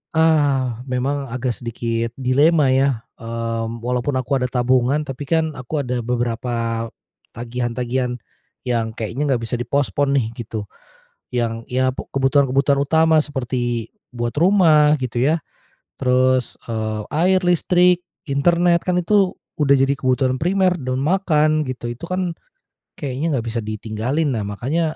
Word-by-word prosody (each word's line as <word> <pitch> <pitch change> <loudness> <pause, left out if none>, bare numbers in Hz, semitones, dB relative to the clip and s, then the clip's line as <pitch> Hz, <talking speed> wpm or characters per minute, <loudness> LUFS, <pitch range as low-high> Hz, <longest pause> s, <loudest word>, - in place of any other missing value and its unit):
Ah, 145 -7 +2
memang 135 +2 -1
agak 125 +1 -2
sedikit 115 0 -3
dilema 140 +3 +3
ya, 130 -3 +2 0.2
eee, 115 0 -3 0.2
walaupun 125 +3 -1
aku 130 +1 0
ada 125 - 0
tabungan 130 +3 +1
tapi 140 0 -7
kan, 160 0 +1
aku 140 +2 -4
ada 125 -1 -2
beberapa 115 -1 -2 0.5
tagihan-tagihan 125 +1 -2 0.5
yang 115 -3 -1
kayaknya 130 +6 -1
nggak 120 - -3
bisa 115 +1 -3
di-postpone 140 +2 0
nih 130 -5 +2 0.2
gitu. 110 -1 -5 0.7
Yang, 115 -2 -2
ya 130 +1 +1
pe - - -5
kebutuhan-kebutuhan 135 +1 +2
utama 160 +2 +4
seperti 120 -5 -3 0.2
buat 120 -1 -3
rumah 160 -5 +5
gitu 125 -3 -3
ya, 150 +6 +3 0.6
terus, 130 -1 +2
eee, 110 -1 -2
air, 185 +4 +3
listrik, 180 +1 +3 0.2
internet, 170 +5 +2
kan 180 -1 +2
itu 195 +1 +3 0.3
udah 140 -1 +5
jadi 135 +1 +2
kebutuhan 130 -1 0
primer 185 +2 +2
dan 130 -1 -2
makan 155 -4 +2
gitu. 120 -2 -4
Itu 125 +8 -9
kan 185 -1 -1 0.6
kayaknya 145 +2 -2
nggak 120 -3 -2
bisa 115 - -2
ditinggalin. 110 +7 -2
Nah 110 -4 -1
makanya, 155 +10 -1
130 Hz, 135 wpm, -20 LUFS, 120-150 Hz, 0.7 s, rumah